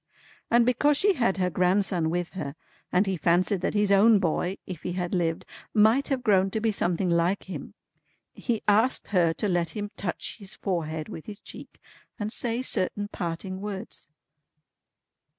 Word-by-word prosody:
And 235 0 +5
because 280 +4 +3
she 405 +4 +4
had 235 - +1
her 180 -1 0
grandson 180 -1 +1
with 175 +1 -2
her, 145 -7 -5 0.4
and 180 +3 +3
he 190 -2 -1
fancied 175 +4 +2
that 190 - -1
his 205 -1 +2
own 210 +3 +6
boy, 185 +1 0
if 180 -4 -7
he 180 - -3
had 180 -1 -3
lived, 165 -3 0 0.3
might 220 +6 +4
have 265 -3 -1
grown 195 -4 +4
to 220 - -2
be 220 0 +1
something 180 -2 0
like 170 +3 +1
him, 185 - -8 0.6
he 230 -3 -2
asked 220 +5 +3
her 175 -4 +3
to 210 - -2
let 175 -3 0
him 205 0 -4
touch 185 -3 -4
his 200 0 -8
forehead 160 -5 -3
with 160 - -9
his 205 -2 -8
cheek - - -12 0.4
and 215 0 -3
say 240 +1 -2
certain 205 -2 0
parting 185 +2 -4
words." 205 -6 -7
190 Hz, 170 wpm, -27 LUFS, 175-215 Hz, 0.6 s, own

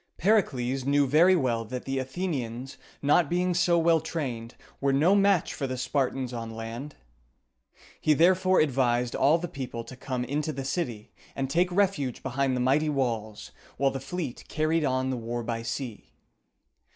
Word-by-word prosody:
Pericles 135 - +1
knew 140 +1 +3
very 165 +7 +5
well 120 -8 0
that 125 +3 -6
the 135 0 -1
Athenians, 130 -4 -4 0.3
not 145 +2 +4
being 180 +1 +1
so 175 0 +3
well 165 0 +4
trained, 125 -8 -4 0.2
were 140 0 +1
no 155 +8 +4
match 200 -3 +3
for 135 - -3
the 130 0 -4
Spartans 130 -1 -1
on 115 -1 -5
land. 115 +6 -7 1.0
He 155 - +3
therefore 185 +3 +4
advised 125 -4 +1
all 145 +5 +4
the 175 +1 -4
people 125 -6 -6
to 130 - -10
come 125 -1 -3
into 150 +4 -2
the 135 -2 -5
city, 130 -8 -3 0.2
and 135 -1 -2
take 180 +4 +2
refuge 175 - 0
behind 135 +1 0
the - - -1
mighty 140 +5 +2
walls, 115 -7 -2 0.3
while 135 +1 +2
the 135 - -4
fleet 135 -1 -5
carried 155 +1 0
on 130 -1 0
the 130 - -2
war 120 +1 -4
by 115 0 -3
sea. 115 -1 -5
135 Hz, 165 wpm, -27 LUFS, 125-160 Hz, 1.0 s, very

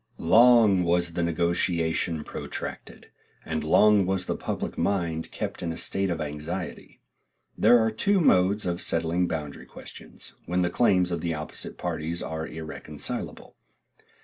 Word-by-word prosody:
Long 110 0 +5
was 85 0 +1
the 85 - -1
negotiation 85 -1 0
protracted, - - -7 0.3
and 80 -1 -3
long 100 +4 +4
was 95 -1 -1
the - - -2
public - - -4
mind 85 -5 -1
kept - - -5
in 85 - -2
a 80 - -6
state 95 0 -1
of 85 -2 -2
anxiety. 80 +4 -6 0.6
There 120 +3 +6
are 110 -1 +2
two 195 - +2
modes 100 - +3
of 90 0 -2
settling 85 +2 0
boundary 75 -4 -5
questions, - - -11
when 90 +2 0
the 90 - 0
claims 90 -6 +2
of 85 -2 -2
the 85 -1 -2
opposite 75 0 -6
parties 80 +2 -3
are 80 0 -4
irreconcilable. 80 0 -6
85 Hz, 145 wpm, -26 LUFS, 80-95 Hz, 0.6 s, There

